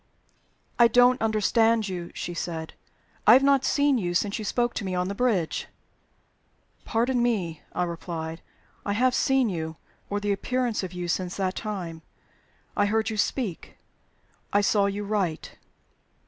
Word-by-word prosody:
"I 235 - +8
don't 245 +2 +4
understand 225 0 +2
you," 175 -2 -5
she 175 - -4
said. 165 -2 -4 0.5
"I 215 - +10
have 265 +2 +6
not 275 -1 +4
seen 285 -3 +2
you 175 -3 -2
since 200 +4 0
you - - -4
spoke 240 +3 0
to - - -4
me 185 -1 -2
on 180 +1 0
the - - -2
bridge." 200 -8 0 1.2
"Pardon 240 +2 +1
me," 185 -10 -1
I 180 - +1
replied. 165 -1 -5 0.4
"I 200 - -1
have 250 +4 +2
seen 265 -1 +3
you 160 -4 -3 0.3
or 205 - -1
the 205 0 -1
appearance 250 +2 -1
of 185 - -5
you 180 -1 -5
since 180 +1 -2
that 190 -2 0
time. 180 -8 -5 0.7
I 205 - +2
heard 220 +1 +1
you 215 - -4
speak. 205 -3 -2 0.7
I 205 - +4
saw 200 0 +3
you 200 +1 -3
write." 200 -6 -2
205 Hz, 160 wpm, -26 LUFS, 180-235 Hz, 1.2 s, I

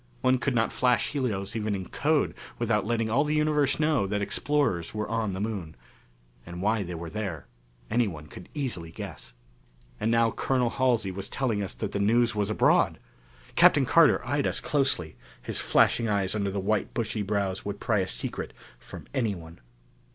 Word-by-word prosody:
One 130 0 +3
could 125 +1 0
not 115 -1 +1
flash 125 -2 +2
helios 110 -8 -2
even 105 -2 -1
in 95 -2 -5
code 150 0 +1 0.2
without - - 0
letting 115 -1 0
all 135 +5 +3
the 150 +1 0
universe 150 -2 +2
know 150 -10 +2
that 105 +1 -1
explorers 105 - 0
were 105 0 -2
on 110 -3 -1
the 95 - -4
Moon. 100 -7 -4 0.7
And 85 +1 -8
why 105 +3 +1
they 90 -2 -5
were 85 0 -6
there, 95 -10 -4 0.4
anyone 100 -10 -1
could 90 +4 -12
easily 120 - -3
guess. 80 - -8 0.7
And 110 - 0
now 115 0 +3
Colonel 125 -1 0
Halsey 120 -7 +1
was 95 +1 -5
telling 115 -6 -1
us 95 - -4
that - - -4
the 100 - -2
news 115 +4 +3
was 105 -1 -1
abroad! 110 - +3 0.6
Captain 135 - +6
Carter 155 -2 +5
eyed 145 +2 0
us - - -1
closely; 130 - 0 0.2
his - - -4
flashing 115 - +3
eyes 100 -3 0
under 100 -2 -1
the 100 +1 -2
white 100 +2 -1
bushy 110 -2 -2
brows 100 -2 -1
would 100 0 -5
pry 110 -3 +1
a 95 - 0
secret - - -4 0.3
from - - -10
anyone. 90 -9 -3
110 Hz, 180 wpm, -27 LUFS, 95-125 Hz, 0.7 s, Captain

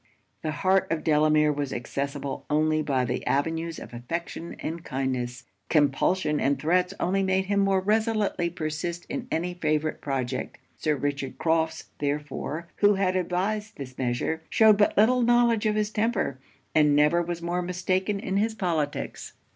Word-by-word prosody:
The 155 - -2
heart 190 +5 +2
of 165 -2 -1
Delamere 150 -1 +4
was 140 -2 -3
accessible 140 +2 -4
only 155 +1 +2
by 135 -4 0
the - - -2
avenues 165 +3 0
of - - -10
affection 165 +7 -5
and 165 +1 -5
kindness; 125 -3 -3 0.3
compulsion 150 +2 +2
and 140 +1 +2
threats 180 +4 +2
only 190 +3 +1
made 190 0 +1
him 200 +1 +1
more 195 -1 +3
resolutely 210 -3 +1
persist 170 +1 -4
in 255 -2 -4
any 175 +2 -1
favourite 155 -2 -1
project. 130 -2 -3 0.2
Sir 155 -2 0
Richard 140 -1 -3
Crofts 160 -1 0
therefore, 150 +2 -3
who 205 0 +5
had 190 -1 +1
advised 190 +4 -1
this 130 -2 -8
measure, 130 +6 -1
shewed 220 -2 +6
but 205 - +2
little 245 +4 +5
knowledge 235 -2 +3
of 210 - +1
his 210 0 0
temper, 210 - 0 0.3
and 150 -2 +4
never 150 +4 +4
was 170 0 -4
more 175 +1 -1
mistaken 185 +3 -1
in 195 -1 -2
his 220 +2 +1
politics. 165 -8 -2
165 Hz, 155 wpm, -26 LUFS, 145-190 Hz, 0.3 s, shewed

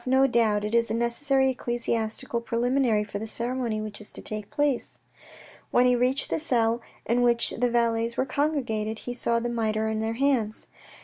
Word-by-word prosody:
" - - -24
No 270 - +6
doubt 225 -5 +2
it 210 +1 -3
is 235 -1 +3
a 220 - -1
necessary 265 +3 +1
ecclesiastical 235 -1 -2
preliminary 235 -1 +1
for 205 -1 -6
the 220 - -5
ceremony 235 -1 -2
which 215 -1 -6
is 210 - -10
to - - -6
take 210 -1 -3
place." 290 -4 -1 0.7
When 245 - +4
he 250 0 +4
reached 250 +3 +1
the - - +1
cell 235 -6 +1 0.2
in 235 +2 +2
which 235 -1 +3
the 245 +1 0
valets 230 -1 +1
were 260 - +1
congregated, 250 -8 -1
he 245 - -3
saw 235 -1 +1
the 240 - -2
mitre 220 -2 0
in 220 0 -1
their 220 +1 -1
hands. 245 -5 0
235 Hz, 190 wpm, -26 LUFS, 220-250 Hz, 0.7 s, No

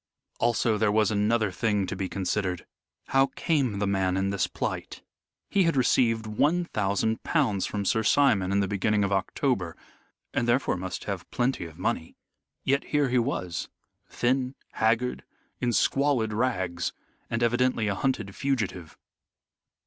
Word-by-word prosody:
Also 115 -2 +2
there 105 -1 +3
was 110 -1 +3
another 105 0 +2
thing 105 0 0
to 90 - -4
be 95 -1 -3
considered. 95 -2 -2 0.4
How 135 0 +4
came 135 -10 +1
the 100 - 0
man 95 -2 +1
in 95 +1 0
this 95 -3 0
plight? - - -4 0.4
He 200 - +2
had 165 - +2
received 115 -3 +3
one 150 +11 +1
thousand 105 - 0
pounds 125 - +1
from 100 -1 -3
Sir 110 +3 +2
Simon 110 -5 +3
in 100 0 +2
the 100 - 0
beginning 105 +1 +1
of 100 - 0
October, 95 - 0 0.6
and 120 - 0
therefore 125 -2 +2
must 90 +1 -5
have 100 -3 -5
plenty 125 -6 0
of 80 -1 -11
money. 80 - -2 0.5
Yet 140 +1 +1
here 145 -3 +1
he 125 0 +3
was 95 -8 -2 0.4
thin, 130 +2 0 0.2
haggard, 115 +3 +1 0.4
in 125 - +1
squalid 130 -3 +2
rags, 95 -7 -1 0.4
and 115 +1 -1
evidently 120 -1 +2
a 100 - +1
hunted 105 -1 -2
fugitive. 105 - -2
110 Hz, 150 wpm, -27 LUFS, 95-125 Hz, 0.6 s, How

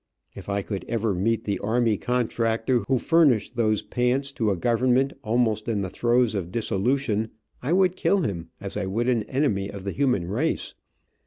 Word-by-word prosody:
If 100 - -10
I 100 0 -1
could 95 -3 -4
ever 115 -2 0
meet 110 +5 0
the 100 -1 -2
army 115 +1 +1
contractor 115 +1 0
who 130 - +3
furnished 130 -7 +3
those 110 -3 +1
pants 130 +3 0
to 115 -5 0
a 95 - 0
government 125 +6 +2
almost 110 -2 +1
in 110 -3 0
the 95 -2 -4
throes 120 +1 +2
of 90 -4 -3
dissolution, 110 +1 0 0.3
I 140 +7 0
would 185 -1 +3
kill 195 +1 +2
him 85 - -3
as 100 0 -6
I 95 - -2
would 115 +6 -1
an 120 -3 +2
enemy 110 -8 0
of 100 -2 -8
the 100 - -3
human 125 -11 +1
race. 125 - -1
115 Hz, 180 wpm, -25 LUFS, 100-125 Hz, 0.3 s, who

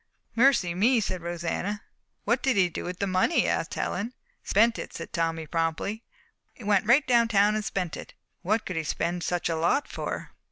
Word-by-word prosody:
"Mercy 235 -8 +4
me!" 230 +7 +3
said 185 -4 -3
Rosanna. 175 +4 -3 0.4
"What 235 +4 +1
did 265 -2 +2
he 185 -2 +4
do 160 - -6
with 180 0 -5
the 200 - -1
money?" 185 - +2
asked - - -1
Helen. 230 +5 -3 0.3
"Spent 225 +3 +3
it," - - -7
said - - -7
Tommy 165 -1 -1
promptly. 165 +7 -2 0.6
"Went 205 -2 +1
right 265 +5 +5
down 235 -2 +4
town 210 -1 +4
and 215 0 -1
spent 180 -5 -2
it." - - -10 0.3
"What 215 +4 0
could 180 - -4
he 160 - 0
spend 175 +3 -2
such 175 -1 -1
a 165 - 0
lot 170 - +1
for?" - - -5
200 Hz, 190 wpm, -27 LUFS, 170-230 Hz, 0.6 s, right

